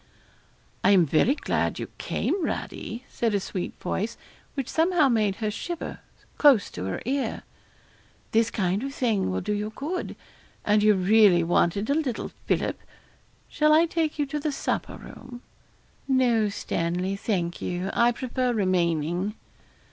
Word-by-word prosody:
'I'm 190 -4 +6
very 165 - +3
glad - - -1
you - - -4
came, 380 -2 -1
Radie,' 235 -5 -4
said 225 -3 -1
a - - +2
sweet 185 -1 -5
voice, 210 +5 -3 0.4
which 275 -3 -2
somehow 325 -3 +3
made 215 -5 +2
her 215 -1 -2
shiver, 340 +10 -5 0.4
close 275 -9 +5
to 90 - -5
her 95 - -4
ear. 270 +2 -2 0.9
'This 225 0 +3
kind 190 -1 0
of 275 +1 -5
thing 220 - +1
will 95 0 -1
do 210 - -2
you 210 +1 -2
good; 320 +7 -4 0.5
and 210 0 +4
you 210 0 +5
really 190 -2 +5
wanted 175 +4 +1
a 280 - +2
little 285 -7 -2 0.2
fillip. - - 0 0.7
Shall 305 0 +3
I 320 +2 +6
take 320 -2 -1
you 295 - +1
to 295 +2 -3
the 295 +1 -1
supper 275 - -3
room?' 245 -1 -11 0.6
'No, 245 -5 +3
Stanley, 180 0 -2
thank 180 -4 -2
you; 180 +2 -2
I 235 +1 +4
prefer 250 0 -1
remaining.' 180 -1 0
220 Hz, 150 wpm, -26 LUFS, 185-270 Hz, 0.9 s, I'm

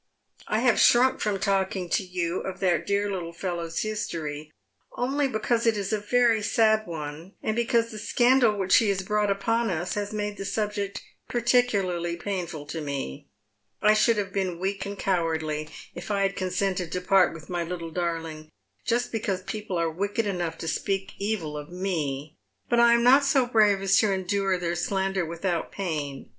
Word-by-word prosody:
" - - -40
I 215 +1 +1
have 245 -2 +3
shrunk 250 +2 +5
from 210 -2 0
talking 195 -2 0
to - - +2
you 180 -1 -2
of 190 -1 -6
that 180 -4 +1
dear 200 0 +1
little 170 -3 -4
fellow's 170 -2 -3
histoiy 155 -8 -4 0.4
only 275 +3 0
because 230 0 0
it 225 -2 +3
is 200 +1 -2
a 215 - +1
very 230 +1 +3
sad 220 0 +2
one, 160 +3 -7
and 215 - 0
because 235 0 +1
the 215 - -7
scandal 240 -1 +3
which 190 -1 +4
he 225 -4 +3
has 195 -1 0
brought 210 +1 +1
upon 225 +4 +1
us 175 0 -2
has 205 0 -3
made 210 -1 -3
the - - -5
subject 205 -1 -2 0.3
particularly 200 -8 +1
painful 175 -6 -4
to 160 +2 -5
me. 140 - -5 0.5
I 210 - +5
should 215 +1 +3
have 195 -2 -2
been 185 -3 -1
weak 195 +2 -2
and 200 0 -6
cowardly 160 -5 -1 0.2
if 175 - -8
I 200 -1 +1
had 195 0 0
consented 185 -2 -1
to 180 - -2
part 190 0 +4
with 160 -1 -11
my 175 -1 -2
little 170 -1 -5
darling 165 -2 -3 0.3
just 240 +1 0
because 195 -5 -2
people 210 -2 -4
are 165 -1 0
wicked 200 +6 -1
enough 175 -5 -2
to - - -4
speak 195 +4 -2
evil 195 -7 -2
of 150 +1 -7
me, 155 -6 -3 0.3
but 240 - +2
I 235 0 +6
am 235 - +2
not 265 +4 +7
so 275 -2 +3
brave 210 -5 +3
as 195 0 +4
to 215 -2 +3
endure 190 0 0
their 175 -1 -2
slander 190 0 -1
without 170 0 -2
pain. 150 -8 -4
195 Hz, 185 wpm, -26 LUFS, 170-215 Hz, 0.5 s, not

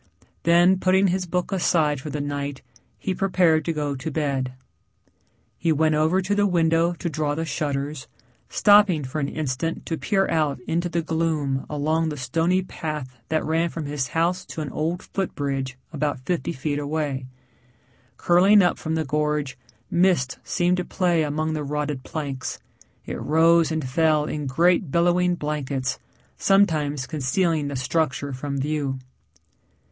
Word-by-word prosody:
Then 175 +2 +4
putting 190 +1 +3
his 180 0 -1
book 180 +3 -2
aside 160 -6 +1
for 150 - -6
the 150 +1 -3
night 145 -1 -4 0.3
he 190 - -2
prepared 180 -4 +2
to - - 0
go 145 -3 -2
to 130 +4 -4
bed. 140 -4 -1 1.1
He 165 - +1
went 155 +1 +3
over 160 +5 +2
to 200 +3 0
the 205 0 +3
window 165 -1 +2
to 170 - -5
draw 150 -2 -1
the 165 +1 -2
shutters, 145 -2 -3 0.4
stopping 205 -7 +5
for 135 +4 -3
an 140 - 0
instant 155 +2 -3
to 165 - -3
peer 195 -2 +1
out 155 -5 0
into 170 +7 -1
the 170 -1 -1
gloom 155 -4 -1
along 155 +2 0
the 150 - -5
stony 165 +8 +1
path 150 -7 -5
that 160 0 0
ran 165 +2 +1
from 165 -2 -5
his 140 -3 -2
house 170 +6 0
to 160 - -6
an 145 -3 -4
old 165 +6 -2
foot 195 -2 -3
bridge 135 -2 -3 0.2
about 145 -3 -2
fifty 170 -3 -1
feet 145 -1 -2
away. 145 -3 -2 0.9
Curling 190 +4 +5
up 180 - +1
from 160 0 -2
the 160 -1 -1
gorge, 150 -1 -1 0.4
mist 170 -7 +2
seemed 180 0 +1
to 180 - -1
play 175 -2 +1
among 155 +1 -1
the 155 -1 -2
rotted 150 -1 -2
planks; 140 -2 -4 0.5
it - - -5
rose 165 +2 +4
and 155 -4 -2
fell 155 +2 +2
in 150 -2 -3
great 170 +5 +2
billowing 175 +3 +2
blankets, 140 -5 -3 0.4
sometimes 155 -8 +2
concealing 155 +2 0
the 140 - -4
structure 140 +1 -1
from 140 +2 -4
view. 140 -1 -1
155 Hz, 160 wpm, -24 LUFS, 145-170 Hz, 1.1 s, stopping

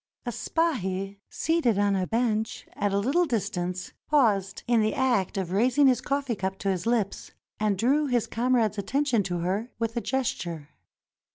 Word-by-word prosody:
A 240 - -2
spahi, 200 - -1
seated 320 -10 +1
on 200 -1 +2
a 185 -1 0
bench 225 -2 -1
at 205 - -1
a 200 - +1
little 275 - +2
distance, 185 - -3
paused 210 -10 +2
in 235 -2 +3
the 215 0 +1
act 240 -7 +1
of 185 -3 -2
raising 250 +8 +3
his 255 -2 +4
coffee 275 -1 -1
cup 190 -2 -3
to 195 - -1
his 185 +2 -3
lips, 230 -4 0 0.3
and 210 -2 +1
drew 280 +8 +2
his 245 -4 +1
comrade's 230 -3 +1
attention 265 +2 +1
to 175 -3 -3
her 195 +7 -1
with 230 0 -2
a 235 - 0
gesture. 175 - -2
220 Hz, 170 wpm, -27 LUFS, 195-255 Hz, 0.3 s, his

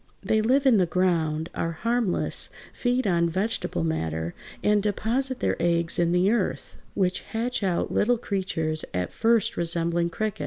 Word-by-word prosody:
They 220 - +2
live 265 +5 +2
in 255 -5 +6
the 180 -3 +3
ground, 165 -3 0
are 165 0 -2
harmless, 230 +1 -1 0.2
feed 245 +1 0
on 170 -3 +2
vegetable 190 - -2
matter, 80 +1 -2 0.3
and 210 0 +3
deposit 240 +6 0
their - - +1
eggs 170 0 +1
in 170 -1 +2
the 180 +3 +3
earth, 225 -5 -2 0.2
which 185 -2 +1
hatch 240 +2 -3
out 185 -3 0
little 240 +3 +2
creatures 175 -7 -1
at 90 0 -2
first 230 -2 +2
resembling 170 0 +2
crickets. 215 +4 -3
185 Hz, 155 wpm, -25 LUFS, 170-225 Hz, 0.3 s, in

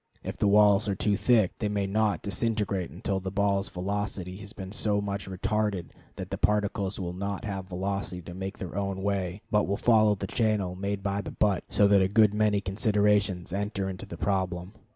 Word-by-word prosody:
If - - -4
the - - +2
walls 105 0 +5
are 100 - 0
too 100 +1 +1
thick, 110 -1 +3
they 105 - 0
may 100 -1 0
not 105 +1 +1
disintegrate 100 -3 -1
until 95 +2 -2
the 95 0 -4
ball's 100 0 +1
velocity 95 0 -3
has 100 0 -10
been 95 -2 -8
so 105 0 0
much 100 -1 -4
retarded 100 -1 -1 0.2
that - - -7
the - - -3
particles 105 -1 0
will 90 -2 -3
not 100 +2 -4
have 95 -3 -4
velocity 95 -1 -3
to 85 - -8
make 95 +2 -5
their 90 -2 -6
own 100 -1 -2
way, 100 -1 -2
but 105 -1 +3
will 100 +1 0
follow 110 -3 +4
the 100 - -5
channel 105 -3 0
made 100 +1 -3
by 100 0 -1
the - - -6
butt; 100 -3 +1
so 100 - +4
that 100 -1 +5
a 95 - +3
good 105 +1 +4
many 105 -1 +2
considerations 100 -2 +1
enter 100 -1 -2
into 95 -1 -6
the 85 - -8
problem. 95 -1 -1
100 Hz, 200 wpm, -28 LUFS, 95-105 Hz, 0.2 s, walls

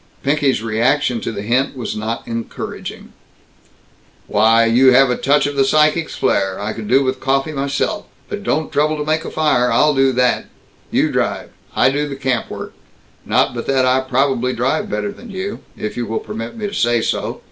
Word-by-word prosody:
Pinky's 140 -4 +1
reaction 115 +2 +1
to - - -3
the 100 -2 -5
hint 130 +5 0
was 120 - -4
not 110 +2 -4
encouraging: 115 0 -6 1.1
"Why, 115 +2 +4
you 125 +3 +5
have 135 0 +5
a - - +1
touch 145 +3 +2
of 145 0 -2
the 135 - +4
psychic's 155 +3 +2
flare! 95 0 0
I 105 +2 -3
could 110 -2 -7
do 135 +4 +4
with 130 0 -1
coffee 135 +3 0
myself. 140 -1 -2 0.2
But - - -5
don't 155 +1 -1
trouble 155 +1 +1
to 150 - -3
make 155 +2 0
a - - -4
fire. 150 -6 +2
I'll 150 0 +4
do 135 -1 +3
that. 125 0 +1 0.4
You - - +1
drive - - -2 0.2
I 130 - +4
do 145 +1 -1
the 140 - -5
camp 130 -4 -1
work. - - -7 0.5
Not - - +2
but 120 -1 -5
that 135 -1 +2
I 130 +1 +3
probably 130 -1 0
drive 135 - -1
better 205 - -2
than 225 +3 -13
you, 195 +1 -5 0.2
if 105 - -4
you 120 -1 -3
will 110 - -2
permit 115 - -7
me 215 - -4
to 205 - -4
say 120 - +1
so. - - -2
135 Hz, 195 wpm, -18 LUFS, 120-150 Hz, 1.1 s, you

